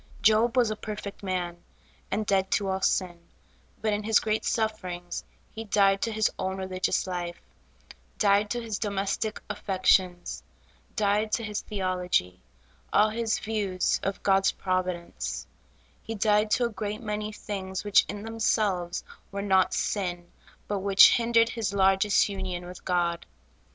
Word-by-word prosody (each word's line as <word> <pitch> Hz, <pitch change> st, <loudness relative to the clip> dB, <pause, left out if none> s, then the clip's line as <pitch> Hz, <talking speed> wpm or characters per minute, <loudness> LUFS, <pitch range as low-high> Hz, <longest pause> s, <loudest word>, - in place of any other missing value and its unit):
Job 225 Hz, +3 st, +4 dB
was 235 Hz, -3 st, +4 dB
a -, -, -2 dB
perfect 210 Hz, -1 st, -7 dB
man, 180 Hz, -3 st, -3 dB, 0.5 s
and 210 Hz, +2 st, -1 dB
dead 190 Hz, -1 st, +1 dB
to 200 Hz, -, +1 dB
all 190 Hz, 0 st, -1 dB
sin; 180 Hz, -3 st, 0 dB, 0.6 s
but 215 Hz, -1 st, +2 dB
in 205 Hz, -, -1 dB
his 220 Hz, +1 st, +3 dB
great 215 Hz, 0 st, -1 dB
sufferings, 185 Hz, -6 st, -2 dB, 0.3 s
he 225 Hz, -, -6 dB
died 195 Hz, -2 st, +3 dB
to 230 Hz, -, 0 dB
his 220 Hz, 0 st, +2 dB
own 190 Hz, 0 st, -2 dB
religious 185 Hz, -1 st, -1 dB
life; 175 Hz, -2 st, -4 dB, 0.8 s
died 205 Hz, 0 st, +3 dB
to 240 Hz, -, -1 dB
his 225 Hz, -3 st, -4 dB
domestic 200 Hz, +1 st, -2 dB
affections; 185 Hz, -3 st, +1 dB, 0.5 s
died 210 Hz, 0 st, +1 dB
to 230 Hz, -, 0 dB
his 210 Hz, -1 st, -3 dB
theology; 180 Hz, -, -1 dB, 0.5 s
all 215 Hz, +1 st, +4 dB
his 225 Hz, 0 st, 0 dB
views 205 Hz, -4 st, -1 dB
of 195 Hz, 0 st, -3 dB
God's 195 Hz, -1 st, +4 dB
providence; 185 Hz, -2 st, -3 dB, 0.6 s
he 225 Hz, -, -6 dB
died 210 Hz, 0 st, +2 dB
to 245 Hz, +3 st, +2 dB
a -, -, 0 dB
great 210 Hz, -1 st, -4 dB
many 210 Hz, -1 st, -3 dB
things 195 Hz, -3 st, -5 dB
which 205 Hz, -1 st, +5 dB
in 205 Hz, +1 st, -5 dB
themselves 215 Hz, -6 st, 0 dB, 0.3 s
were 200 Hz, 0 st, -4 dB
not 190 Hz, -2 st, +3 dB
sin, 175 Hz, -4 st, -2 dB, 0.4 s
but 205 Hz, -1 st, -1 dB
which 195 Hz, 0 st, +7 dB
hindered 230 Hz, -1 st, +3 dB
his 225 Hz, -4 st, -2 dB
largest 195 Hz, +1 st, +4 dB
union 190 Hz, -3 st, -4 dB
with 180 Hz, 0 st, -10 dB
God. 175 Hz, -2 st, 0 dB
200 Hz, 145 wpm, -27 LUFS, 185-215 Hz, 0.8 s, which